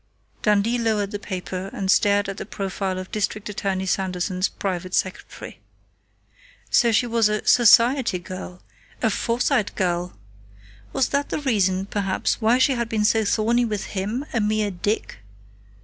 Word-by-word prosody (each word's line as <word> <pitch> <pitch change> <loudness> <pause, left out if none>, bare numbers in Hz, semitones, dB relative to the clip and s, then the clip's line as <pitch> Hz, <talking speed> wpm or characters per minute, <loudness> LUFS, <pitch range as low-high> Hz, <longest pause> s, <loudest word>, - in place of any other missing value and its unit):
Dundee 210 +3 +2
lowered 215 -3 0
the 205 - -4
paper 185 -1 -5
and 190 -1 0
stared 205 0 +3
at 195 0 -5
the - - -5
profile 195 -2 -3
of 185 0 -7
District 210 0 -2
Attorney 195 -2 -2
Sanderson's 185 0 -1
private 185 -2 -3
secretary. 185 - -4 1.1
So 235 -2 +4
she 225 +3 +3
was 230 -2 +2
a 210 0 -2
"society 240 -2 +5
girl," 180 0 -9 0.4
a 225 - +3
"Forsyte" 230 -1 0
girl! 175 -1 -1 0.7
Was 265 - +1
that 285 0 -1
the - - -2
reason, 195 -8 +1
perhaps, 200 +2 -1
why 225 +3 +4
she 260 +2 +3
had 235 -3 -1
been 215 -2 0
so 220 +1 +3
thorny 230 +3 +2
with 210 -4 -2
him, 210 +8 -2
a 230 - +1
mere 210 0 0
"dick"? 200 - -3
205 Hz, 150 wpm, -23 LUFS, 190-230 Hz, 1.1 s, society